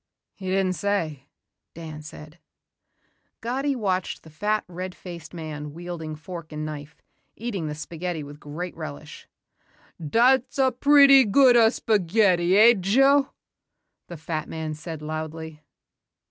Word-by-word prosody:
"He 190 - -9
didn't 190 0 +1
say," 165 -8 -2 0.5
Dan 155 -2 -8
said. 155 +2 -12 1.0
Gatti 270 +4 -1
watched 190 -6 -2
the 160 - -15
fat, 210 +7 -1
red 180 +1 -6
faced 170 -3 -10
man 150 -3 -7
wielding 170 -2 -6
fork 170 0 -9
and 155 0 -4
knife, 150 0 -8 0.3
eating 205 -8 -4
the 150 - -4
spaghetti 165 +1 -5
with 145 +1 -11
great 165 +5 -6
relish. 70 0 -9 0.8
"Dat's 245 - +3
a 265 -1 +3
pretty 280 +1 +7
good 250 +3 +5
a' 230 -2 +6
spaghetti, 190 -4 +2
eh 230 +3 +8
Joe?" 270 +9 +4 0.8
the 175 - -8
fat 155 0 -4
man 160 -1 -4
said 155 0 -8
loudly. 155 0 -6
175 Hz, 130 wpm, -25 LUFS, 155-215 Hz, 1.0 s, eh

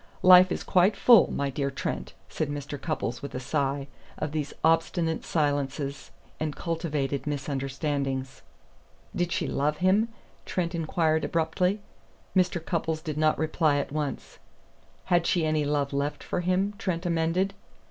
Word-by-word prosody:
Life 185 0 +8
is - - -2
quite 185 +3 +3
full, 235 -5 +6
my 140 -1 -1
dear 140 +1 -1
Trent," 135 - -4
said 155 - -3
Mr. 145 -1 -5
Cupples 125 -7 -3
with 140 - -7
a - - -2
sigh, 140 +1 -1 0.3
"of 150 - -3
these 150 -2 -2
obstinate 165 +1 +2
silences 145 -2 -1 0.3
and 155 -2 -2
cultivated 150 -5 -2
misunderstandings." 135 -1 -2 0.7
"Did 175 -1 0
she - - 0
love 150 +2 0
him?" 195 +6 +3 0.3
Trent 170 -2 -2
inquired 160 -1 +1
abruptly. 180 +5 0 0.5
Mr. 180 -2 +2
Cupples 160 -2 -1
did 155 -3 -3
not 155 0 +3
reply 155 -1 +2
at 145 - -2
once. 150 -1 -4 0.7
"Had 175 -1 +2
she 170 -3 +2
any 155 -1 +1
love 145 -1 0
left 140 +1 -2
for - - -2
him?" 185 +3 +1
Trent 180 -2 -2
amended. 170 +3 +1
Mr. 200 0 -22
155 Hz, 145 wpm, -27 LUFS, 145-175 Hz, 0.7 s, Life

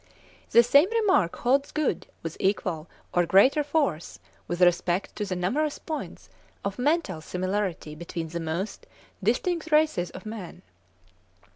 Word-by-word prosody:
The 235 - +7
same 285 - +5
remark 410 - +2
holds 275 +3 +1
good 305 -2 -1 0.2
with 165 -1 -5
equal 180 -5 -1 0.3
or 175 -1 +2
greater 260 - +5
force 285 - -1 0.3
with 175 - -3
respect 175 +1 +2
to 210 - -1
the 190 -2 -3
numerous 280 +13 0
points 315 -2 -6 0.4
of 200 +4 -3
mental 280 - 0
similarity 185 -2 -2
between 165 +1 -6
the 170 +1 -4
most 170 +5 -4 0.3
distinct 320 - 0
races 300 - +3
of 185 - -11
man. 215 -5 -8
200 Hz, 135 wpm, -26 LUFS, 175-290 Hz, 0.4 s, The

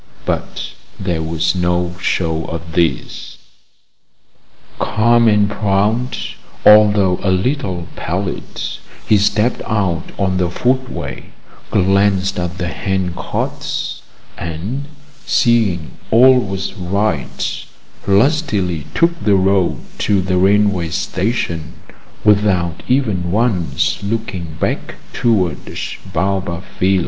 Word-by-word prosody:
But - - -3 0.3
there 90 -4 -1
was 80 0 0
no 90 -1 0
show 80 -2 0
of 85 0 -6
this. 80 -6 -1 1.4
Calm 115 +2 +3
and 105 -1 +4
proud, 105 +4 0 0.5
although 105 -3 +6
a 100 - 0
little 95 - -1
pallid, 95 +3 -4 0.5
he 105 - +5
stepped 105 +4 +1
out 95 -7 -1
on 95 -2 0
the 90 -1 +1
footway, 130 +7 -2 0.4
glanced 95 0 +2
at 90 +1 -3
the 90 - -2
hand 95 0 -2
carts, - - -3 0.4
and, 90 - -4 0.4
seeing 105 -9 +2 0.2
all 125 +3 +7
was 95 -4 -3
right, 95 -5 -2 0.4
lustily 100 - +2
took 170 0 +2
the 105 -2 +4
road 95 -1 +2 0.2
to 100 -2 +2
the 90 0 0
railway 95 -2 +3
station, 90 -2 -2 0.5
without 95 -5 +2
even 105 -10 +1
once 95 - 0
looking 100 -7 -4
back - - -2 0.2
towards 95 -10 -1
Baobab 90 -1 -1 0.2
Villa. 95 +1 +3
95 Hz, 100 wpm, -18 LUFS, 90-105 Hz, 1.4 s, all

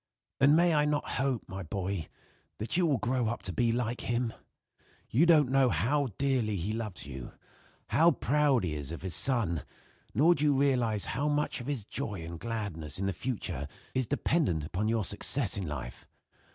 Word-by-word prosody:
"And 140 +2 +6
may 170 0 +4
I 150 -1 +3
not 150 0 0
hope, 135 -4 0
my 95 +1 -6
boy, 95 0 -3 0.5
that 110 - -3
you 175 -1 +3
will 145 -4 +2
grow 125 +2 0
up 120 +2 -3
to 90 - -2
be 115 +5 +2
like 120 0 -1
him? 120 -1 -1 0.8
You 155 +9 +4
don't 150 -6 +5
know 135 -1 +4
how 130 - +1
dearly 130 -6 +1
he 95 +3 -2
loves 110 -8 -4
you; 65 -3 -8 0.6
how 165 +3 +5
proud 140 - +2
he 80 -4 -1
is 75 -1 -5
of 85 - -7
his 95 -2 -3
son; 110 - +2 0.5
nor 165 +5 +6
do 150 - -1
you 145 -2 +4
realize 125 -7 +2
how 145 - 0
much 145 -3 0
of 120 - -8
his 135 -8 -3
joy 105 -8 -4
and 85 0 -7
gladness 100 - -4
in 95 - -2
the 95 - 0
future 105 - -4 0.3
is 130 -2 0
dependent 140 - +1
upon 95 +7 -2
your 115 -1 +1
success 105 +2 0
in 95 -4 -3
life. 65 -5 -6
115 Hz, 190 wpm, -30 LUFS, 95-140 Hz, 0.8 s, And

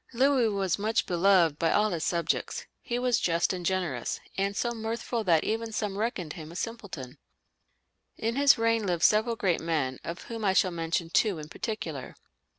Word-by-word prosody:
Louis 260 -1 +3
was 195 -3 0
much 220 +3 +1
beloved 175 -4 +3
by 165 - +2
all 210 0 +3
his 165 -2 -2
subjects. 170 -1 -1 0.2
He 240 - -2
was 245 -2 +2
just 170 +2 +1
and 180 -1 -5
generous, 175 -10 -1 0.2
"and 200 +1 -1
so 240 - 0
mirthful 230 0 -3
that 165 -4 +4
some - - 0
even 220 -3 -2
reckoned 205 - -2
him 160 -1 -9
a - - -11
simpleton.'* 175 - -6 1.0
In 230 +1 -1
his 280 0 +6
reign 230 -2 +1
lived 175 -2 0
several 220 +2 +4
great 190 -6 0
men, 150 -6 -1
of 170 +1 -6
whom 230 -2 -6
I 195 -2 +3
shall 185 -1 +3
mention 165 0 -2
two 205 -2 +2
in 150 0 -8
particular. 165 - -5
195 Hz, 180 wpm, -28 LUFS, 170-225 Hz, 1.0 s, his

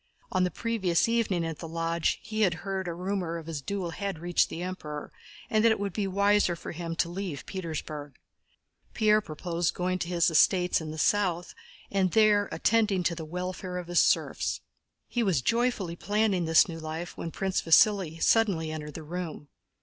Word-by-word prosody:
On 185 - +2
the 180 - +2
previous 195 -6 0
evening 220 -7 +1
at 165 -2 -5
the 165 - -6
Lodge, 165 0 -1
he 220 0 -3
had 180 -5 +3
heard 190 -1 -2
that - - -1
a - - -3
rumor 180 -2 -2
of 165 - -8
his 160 -3 -5
duel 185 +2 -3
had 200 +1 -4
reached 175 +2 +1
the 170 - -5
Emperor 150 -5 -6 0.4
and 215 0 +2
that 230 - +6
it 220 - 0
would 200 -2 -3
be 200 0 -1
wiser 200 -1 +3
for - - -7
him 165 0 -5
to 165 - +1
leave 175 -5 -5
Petersburg. 155 -5 -5 0.8
Pierre 215 -1 +4
proposed 170 0 -2
going 185 +1 -1
to 170 - -3
his 170 -1 +2
estates 180 +2 +4
in 155 - -6
the 155 - -6
south 180 0 +1 0.4
and 195 -2 +2
there 210 -2 +4
attending 210 -5 +2
to 170 - +1
the 165 -1 -6
welfare 180 +2 -4
of 180 - -4
his 175 - +3
serfs. - - +1 0.5
He 240 - -1
was 180 - +1
joyfully 230 - 0
planning 205 -1 +1
this 160 0 +5
new 165 -2 -6
life, 160 +2 -5
when 165 - -5
Prince 190 +3 -1
Vasíli 170 -1 +4
suddenly 190 -9 +3
entered 150 -1 -6
the 160 - -6
room. 160 -2 -6
180 Hz, 190 wpm, -28 LUFS, 165-200 Hz, 0.8 s, that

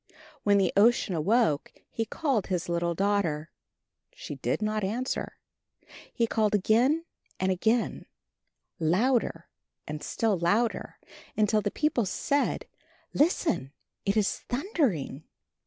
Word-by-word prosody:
When 205 -1 +4
the 190 -3 +2
Ocean 210 -1 +4
awoke 170 -1 +2 0.2
he 225 - -2
called 255 - -1
his 180 -2 -2
little 170 0 0
daughter. 180 -6 0 0.6
She - - -7
did - - -2
not 215 0 -1
answer. 235 +7 -2 0.7
He 235 - +1
called 215 -2 +1
again 245 - +3 0.3
and 190 0 +1
again, 220 +6 0 0.7
louder 180 +1 +1 0.4
and 150 0 -5
still 215 -5 0
louder, 210 +7 0 0.4
until 215 0 +3
the 205 - -1
people 280 -3 0
said, 280 +9 0 0.5
"Listen, 295 - +1 0.3
it 200 +2 +1
is 210 -2 +1
thundering!" 245 - -1
210 Hz, 115 wpm, -28 LUFS, 180-240 Hz, 0.7 s, When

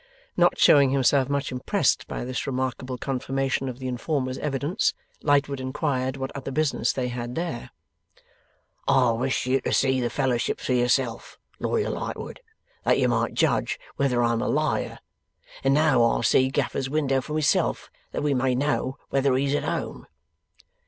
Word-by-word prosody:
Not - - +3
showing 140 -2 +6
himself 135 0 +3
much 140 -1 -1
impressed 125 -1 0
by - - -4
this 130 +1 -3
remarkable 130 -1 -3
confirmation 135 +1 -2
of 125 - -7
the 130 0 -5
informer's 130 +1 -2
evidence, 145 - 0 0.3
Lightwood 140 -1 +2
inquired 130 -1 -2
what 135 +1 -5
other 135 -1 -5
business 150 +1 +1
they 125 -2 -2
had 120 0 -5
there? 165 -8 -4 1.2
'I 130 -3 +4
wished 125 +4 -1
you 130 +1 +1
to - - -2
see 130 -1 +2
the 120 - 0
Fellowships 125 -1 -1
for 130 - +1
yourself, 125 -1 0 0.2
Lawyer 440 - 0
Lightwood, - - -5 0.4
that - - +3
you - - +2
might - - 0
judge - - +1 0.2
whether 125 -3 +2
I'm 115 -1 +1
a - - -1
liar; - - 0 0.7
and 135 - +3
now 145 -3 +4
I'll 115 - +2
see 130 +4 +4
Gaffer's 135 0 -1
window 135 -3 +1
for 150 +4 -5
myself, 155 -2 +1 0.2
that - - -3
we 145 -1 +2
may 130 -1 +1
know 135 0 -1
whether 135 -1 +2
he's 140 +1 +1
at 145 - 0
home. - - -4
130 Hz, 160 wpm, -25 LUFS, 125-140 Hz, 1.2 s, showing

